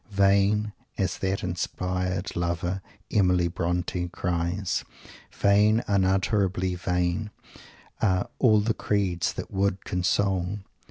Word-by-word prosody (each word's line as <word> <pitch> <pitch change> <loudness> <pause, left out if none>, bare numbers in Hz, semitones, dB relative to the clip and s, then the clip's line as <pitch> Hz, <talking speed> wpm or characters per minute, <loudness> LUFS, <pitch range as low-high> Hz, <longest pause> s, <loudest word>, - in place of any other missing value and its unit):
"Vain," 100 +1 +3 0.2
as 95 -2 -1
that 95 0 -1
inspired 90 +1 -2
Lover, 85 +2 -1 0.3
Emily 90 -3 +3
Bronte, 90 +1 -2
cries, 90 +2 -1 0.5
"vain, 105 +3 +3
unutterably 95 -1 +1
vain, 90 +3 -1 0.7
are 95 -3 +2
'all 110 -5 +5
the 110 +2 +1
creeds' 95 -6 0
that - - -6
would 100 0 0
console!" 95 +2 0
95 Hz, 100 wpm, -26 LUFS, 90-100 Hz, 0.7 s, all